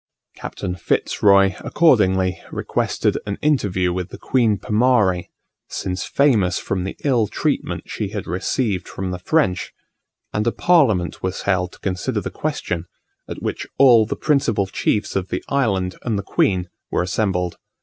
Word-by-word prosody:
Captain 90 -2 -5
Fitz 90 - -1
Roy 100 -2 +5
accordingly 95 - +2
requested - - -1
an 100 - -3
interview 95 -12 +1
with 90 -1 -3
the - - -9
Queen 115 -5 +2
Pomarre, 105 -4 +2 0.4
since 90 -1 -3
famous 110 -11 +2
from 95 -1 -2
the 95 - -5
ill 125 -7 +2
treatment - - -2
she 105 - -4
had 100 -2 -5
received 95 +3 -1
from 95 -1 -4
the 90 - -4
French; 90 - 0 0.6
and 105 +2 0
a - - +3
parliament 115 - +2
was 95 0 -3
held 90 -2 0
to - - -16
consider 90 -2 -2
the - - -5
question, 85 0 -3 0.4
at - - -7
which - - -3
all 120 -5 +6
the - - -2
principal 135 -9 +1
chiefs 105 +2 -1
of 95 -1 -1
the - - -3
island 100 -10 +1
and 115 -4 -1
the 100 - -3
queen 90 -2 +1 0.2
were - - 0
assembled. 90 -2 -1
100 Hz, 155 wpm, -21 LUFS, 90-115 Hz, 0.6 s, all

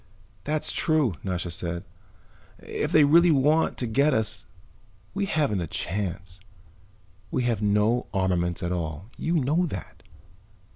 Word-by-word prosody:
"That's 150 +1 +1
true," 155 - +1
Nasha 90 -2 -3
said. 85 0 -4 0.7
"If - - -4
they 155 - +6
really 170 +5 +6
want 150 +2 +3
to 125 - -1
get 140 +5 +2
us 110 -1 0 0.7
we 200 0 -1
haven't 145 - 0
a 85 - -3
chance. 90 +1 -4 0.9
We 125 - -1
have 115 -3 0
no 105 +4 +2
armaments 90 -3 0
at 90 - -1
all; 85 +3 -4
you 165 +2 -1
know 160 +4 +2
that." 95 - -8
110 Hz, 135 wpm, -26 LUFS, 90-150 Hz, 0.9 s, they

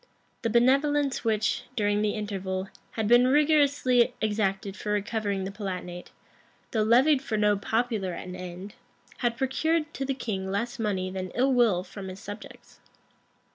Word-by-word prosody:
The 230 - 0
benevolence 275 +4 +3
which, 220 -2 0
during 205 -1 +1
the 210 -1 0
interval, 195 -2 -3 0.2
had 220 -2 -1
been 240 +2 +6
rigorously 280 -4 +3
exacted 200 -2 -1
for 210 - -4
recovering 205 -1 -1
the 190 - -4
Palatinate, 180 -3 -6 0.6
though 220 - +1
levied 260 +6 +4
for 225 -5 -2
no 210 0 +3
popular 220 -2 -1
an 180 +1 -7
end, 185 +2 -8 0.4
had 235 -1 -1
procured 305 +5 0
to 275 - -3
the 270 0 -1
king 195 -7 -3
less 230 +5 -2
money 190 -4 -1
than 185 -1 -4
ill 265 +2 +3
will 225 -8 +3
from 190 +1 -9
his 185 +1 -8
subjects. 205 +2 -11
215 Hz, 150 wpm, -27 LUFS, 195-250 Hz, 0.6 s, been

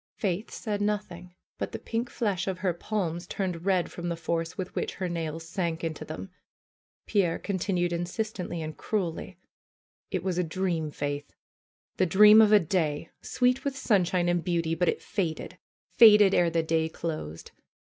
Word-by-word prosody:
Faith 195 +1 -2
said 210 -3 -4
nothing. 180 -4 -3 0.2
But - - -4
the - - -2
pink 230 +2 -3
flesh 200 -6 -1
of 190 -1 -1
her 180 - +2
palms 175 -2 -3
turned 180 -3 -3
red 185 -3 +2
from 175 0 -5
the 170 - -1
force 165 +1 -2
with 185 -1 -5
which - - -3
her 185 - -3
nails 165 -1 -4
sank 170 -3 -2
into 160 -2 -3
them. 185 +5 -7 0.7
Pierre 190 -6 +1
continued 180 -3 -1
insistently 175 0 -3
and 155 0 -6
cruelly. 180 -7 -3 0.7
^Ht 185 -3 -2
was 180 -2 -1
a - - +2
dream, 170 -2 -1
Faith! 145 0 -4 0.6
The 185 - +3
dream 210 +5 +8
of 215 -1 +5
a 210 - +8
day! 160 -3 -1
Sweet 250 0 +1
with 275 -1 -2
sunshine 180 -7 +2
and 175 -1 +1
beauty; 170 -2 0
but 175 +2 +1
it - - -2
faded, 170 -6 -3 0.3
faded 210 -4 +7
ere 175 -1 +4
the 165 0 0
day 160 0 +1
closed! 155 - -6
175 Hz, 170 wpm, -28 LUFS, 165-200 Hz, 0.7 s, dream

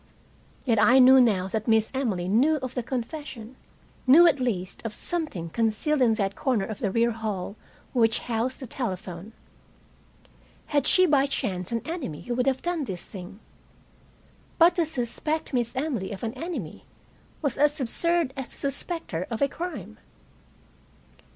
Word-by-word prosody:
Yet 230 -5 +2
I 250 +4 +6
knew 260 0 +8
now 200 -6 +2
that 215 +2 -3
Miss 220 -1 +3
Emily 215 -10 -1
knew 255 +11 +3
of 255 - -4
the 250 - -1
confession; 250 -1 -6 0.5
knew, 315 +7 +8
at 305 -5 +4
least, 200 -8 -3
of 225 -2 -4
something 305 - -4
concealed 230 - 0
in 230 -3 +4
that 200 -2 -1
corner 245 -8 0
of 220 - -6
the 220 -7 0
rear 230 +4 +2
hall 215 -4 -4 0.4
which 225 -3 +2
housed 240 +3 -2
the - - -5
telephone. 190 -6 -5 1.3
Had 285 -3 +1
she 370 - +6
by 285 -4 +3
chance 185 -8 -3
an 230 -1 -2
enemy 305 - -5
who 245 - -4
would 250 +2 0
have 265 -1 +1
done 345 -4 -1
this 185 -6 -6
thing? 190 +1 -10 1.2
But 340 +1 +6
to 335 -3 +2
suspect 300 +3 -3
Miss 240 -1 0
Emily 255 -9 -2
of 195 - -7
an 225 0 -2
enemy 260 - -6 0.6
was 275 -3 -1
as 295 +1 +3
absurd 330 +3 +1
as 265 -2 -5
to - - -6
suspect 320 +5 -2
her 170 +1 -3
of 230 -2 -3
a 280 - +3
crime. 280 - -7
245 Hz, 165 wpm, -26 LUFS, 215-285 Hz, 1.3 s, knew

